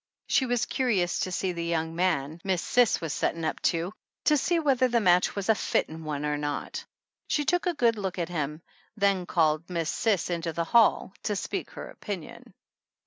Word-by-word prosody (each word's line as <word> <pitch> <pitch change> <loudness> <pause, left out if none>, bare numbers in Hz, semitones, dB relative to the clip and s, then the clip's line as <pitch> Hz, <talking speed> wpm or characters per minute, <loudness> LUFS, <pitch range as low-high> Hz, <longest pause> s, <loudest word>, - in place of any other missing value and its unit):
She 260 - +2
was 240 -1 +1
curious 200 -9 0
to 185 - -1
see 185 +1 -1
the 170 -1 -4
young 165 -1 -1
man 165 -3 0
"Miss 185 -3 0
Cis 245 -3 +3
was 160 -3 -3
settin* 165 -1 -1
up - - -2
to, 170 +3 -2 0.3
to 300 - +4
see 340 +5 +1
whether 270 -5 +3
the 240 -1 +2
match 180 -4 +3
was 200 -2 -3
a 220 - +6
fittin' 160 -5 -1
one 150 -1 -3
or 150 0 -1
not." 145 - -3 0.4
She 295 - 0
took 355 +2 +1
a 350 - 0
good 230 -5 +2
look 190 -2 -3
at 170 -1 -2
him, 155 -1 -3 0.3
then 200 -3 +2
called 160 0 +1
Miss 170 -3 -1
Cis 205 -5 0
into 165 -1 -2
the 170 - -1
hall 220 +1 +3
to 210 - -1
speak - - -3
her - - -8
opinion. 190 -6 -8
180 Hz, 195 wpm, -27 LUFS, 165-230 Hz, 0.4 s, a